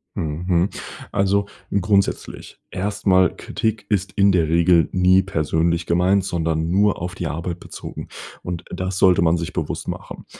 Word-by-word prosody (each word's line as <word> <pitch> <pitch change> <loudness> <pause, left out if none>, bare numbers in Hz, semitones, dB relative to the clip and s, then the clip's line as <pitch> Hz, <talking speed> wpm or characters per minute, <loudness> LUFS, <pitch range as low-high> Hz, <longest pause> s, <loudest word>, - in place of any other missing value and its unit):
Mhm, 80 +2 -3
mhm, 90 +1 +2 0.4
also, 100 +1 +1 0.2
grundsätzlich 100 0 -1
erst 100 +3 -4
mal, 95 -1 +4
Kritik 110 -2 -3
ist 100 -3 0
in 100 0 +4
der 85 -4 +2
Regel 85 0 +4
nie 95 +1 +4
persönlich 85 -1 0
gemeint, 90 +3 +3
sondern 80 -3 -1
nur 100 +2 +2
auf 90 +1 -4
die 90 - -4
Arbeit 85 +2 -4
bezogen - - -9 0.3
und 85 -1 -5
das 95 +1 -3
sollte 90 -3 +5
man 85 +1 +3
sich 85 - -4
bewusst - - -3
machen. - - -7
90 Hz, 155 wpm, -21 LUFS, 85-95 Hz, 0.4 s, sollte